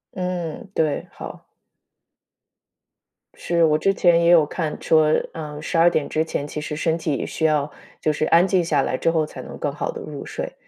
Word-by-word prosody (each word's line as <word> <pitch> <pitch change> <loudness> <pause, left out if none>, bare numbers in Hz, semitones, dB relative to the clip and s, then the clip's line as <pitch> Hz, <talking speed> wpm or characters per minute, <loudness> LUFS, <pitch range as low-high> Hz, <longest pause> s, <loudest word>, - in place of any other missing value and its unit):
嗯， 180 -1 -4
对， 155 -3 0
好。 - - -10 1.9
是， 170 -1 0
我 155 -1 +4
之 195 +5 +2
前 170 -2 +4
也 170 - +4
有 170 -3 +6
看 155 0 -3
说， 155 -1 +3 0.2
呃， 150 -2 -7
十 165 - -2
二 170 +1 +6
点 155 -4 -1
之 155 - 0
前 145 -3 -4
其 150 - -5
实 150 0 -5
身 160 +1 0
体 155 -3 -1
也 - - -3
需 160 - -2
要 150 -2 +1 0.3
就 155 - +1
是 155 - -1
安 170 +4 +4
静 185 -2 +2
下 170 - +1
来 - - -1
之 150 - +1
后 160 -2 +1
才 - - -9
能 - - -9
更 - - -2
好 - - -3
地 465 -2 -8
入 - - -7
睡。 - - -5
160 Hz, 220 characters per minute, -22 LUFS, 150-175 Hz, 1.9 s, 有